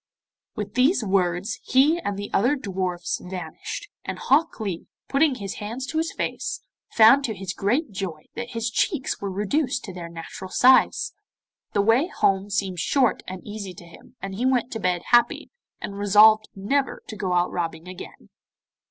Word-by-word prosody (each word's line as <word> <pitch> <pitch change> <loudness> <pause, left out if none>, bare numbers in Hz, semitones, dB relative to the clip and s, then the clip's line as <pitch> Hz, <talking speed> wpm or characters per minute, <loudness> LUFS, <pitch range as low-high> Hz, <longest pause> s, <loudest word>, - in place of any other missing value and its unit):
With 205 -1 -5
these 255 +3 +3
words 190 +2 0
he 290 +6 +4
and 205 -11 -3
the 205 0 -6
other 245 +9 +3
dwarfs 185 -7 -3
vanished, 180 - -6 0.2
and - - -5
Hok 320 +5 +2
Lee, 195 -6 -4 0.2
putting 280 0 +3
his 200 -5 -6
hands 230 +5 -4
to 315 +3 -2
his 325 +1 -1
face, - - -3 0.3
found 230 +5 +7
to 220 - -3
his 190 -1 -5
great 245 +7 0
joy 185 -6 -5
that 240 +1 -6
his 230 0 -2
cheeks 295 - -1
were 200 - -2
reduced 250 +8 -1
to 190 - -7
their 170 -2 -7
natural 170 +3 -8
size. 255 +6 +4 0.6
The 200 - +2
way 230 +9 +4
home 195 - +1
seemed 195 -3 -1
short 255 - +2
and 185 0 -7
easy 205 -3 -7
to 175 - -12
him, 170 +8 -17
and 195 0 -4
he 215 +6 -3
went 255 -2 +1
to 225 - -4
bed 180 -3 0
happy, 240 0 +3 0.3
and 200 0 -6
resolved 215 +2 +6
never 265 +8 -1
to 220 - -7
go 190 -3 -2
out 175 0 +2
robbing 165 -1 -4
again. 180 - -10
205 Hz, 175 wpm, -24 LUFS, 185-250 Hz, 0.6 s, found